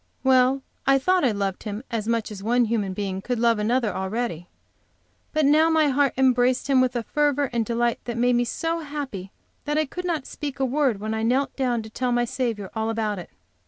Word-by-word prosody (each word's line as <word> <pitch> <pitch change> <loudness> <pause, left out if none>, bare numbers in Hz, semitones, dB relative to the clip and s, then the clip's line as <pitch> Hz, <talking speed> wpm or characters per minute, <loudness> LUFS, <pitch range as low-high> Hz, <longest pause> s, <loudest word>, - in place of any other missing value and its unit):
Well, 260 0 +4 0.2
I 275 0 +6
thought 365 +6 +2
I 260 - +4
loved 200 -2 -2
him 210 +2 -5
as 220 -2 -2
much 230 -2 -1
as 200 -2 -8
one 240 +3 +2
human 215 -4 -1
being 195 -1 -3
could 245 +4 -2
love 230 -1 +2
another, 230 0 +1
already, 190 -3 -3 0.8
but 310 -1 +2
now 310 +3 +5
my 315 -2 +3
heart 280 0 +2
embraced 255 -1 +3
him 270 -2 +4
with 255 -1 +1
a 240 - -1
fervor 290 0 +1
and 235 -1 +1
delight 235 +1 0
that 235 -1 -4
made 245 +1 +3
me 240 - +3
so 330 +7 -2
happy 280 - -6 0.3
that 295 0 -1
I 310 - +2
could 360 +6 -6
not 325 -6 -1
speak 285 -2 -6
a 265 - +2
word 260 -5 +1
when 215 +1 -3
I 220 - -2
knelt 255 +5 +1
down 245 -4 0
to 220 - -10
tell 250 +2 -1
my 240 0 +2
Saviour 230 -6 -3
all 220 0 -1
about 215 -3 -1
it. 175 - -9
245 Hz, 220 wpm, -24 LUFS, 220-275 Hz, 0.8 s, I